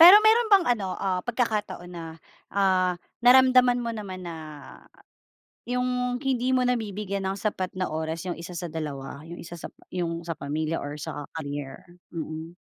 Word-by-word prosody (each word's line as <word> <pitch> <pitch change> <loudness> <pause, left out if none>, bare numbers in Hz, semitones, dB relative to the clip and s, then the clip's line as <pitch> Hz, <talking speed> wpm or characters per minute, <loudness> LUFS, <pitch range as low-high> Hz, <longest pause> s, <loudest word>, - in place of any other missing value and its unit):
Pero 355 +5 +12
mayro'n 450 +1 +6
bang 390 -4 +6
ano, 190 -3 -3
ah, 185 -2 0
pagkakataon 215 -6 -1
na, 170 -1 -6 0.4
ah, 185 -2 +2 0.2
naramdaman 250 -1 +6
mo 230 - -1
naman 190 -4 -6
na, 170 -1 -5 1.3
yung 250 0 0
hindi 255 -1 0
mo 250 - +3
nabibigyan 205 -5 -1
ng 195 - -2
sapat 195 -3 -1
na 185 -4 -1
oras 160 +2 -3
yung 175 -2 -4
isa 175 0 -7
sa 170 -2 -4
dalawa, 140 -3 -5
yung 170 - -7
isa 170 - -10
sa - - -6
pa - - -23
yung 170 -2 -2
sa 170 - -2
pamilya 155 +2 -2
or 145 +1 -5
sa 145 0 -6
career? 145 -3 -5 0.2
Mm. 160 0 -6
185 Hz, 165 wpm, -27 LUFS, 165-245 Hz, 1.3 s, Pero